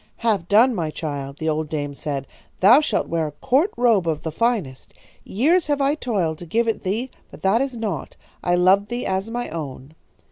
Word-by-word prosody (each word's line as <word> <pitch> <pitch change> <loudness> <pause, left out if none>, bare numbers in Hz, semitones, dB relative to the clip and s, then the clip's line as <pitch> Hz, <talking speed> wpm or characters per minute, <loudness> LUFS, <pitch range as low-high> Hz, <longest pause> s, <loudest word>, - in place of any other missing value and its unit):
"'Have 210 -7 0
done, 230 +6 +5
my 165 -7 -2
child,' 140 -3 -5
the 160 - -4
old 155 -1 -1
dame 145 -2 -3
said. 140 -1 -4 0.3
'Thou 220 +9 +7
shalt 310 - -1
wear 165 -2 -1
a 150 - -8
court 270 - +2
robe 225 -8 +3
of 155 -2 -1
the 160 - -3
finest. 185 - -2 0.3
Years 315 - +2
have 290 -1 +1
I 280 +1 +2
toiled 195 - -2
to 175 - -9
give 230 +7 +1
it 225 - -1
thee, 220 +7 -2 0.2
but - - -14
that 200 +5 +3
is 270 -3 -2
naught. 205 -11 -4 0.3
I 175 - +2
loved 190 +3 +4
thee 240 +1 -3
as 190 +3 -1
my 240 +1 -3
own.' 145 -3 -7
190 Hz, 205 wpm, -22 LUFS, 155-240 Hz, 0.3 s, Thou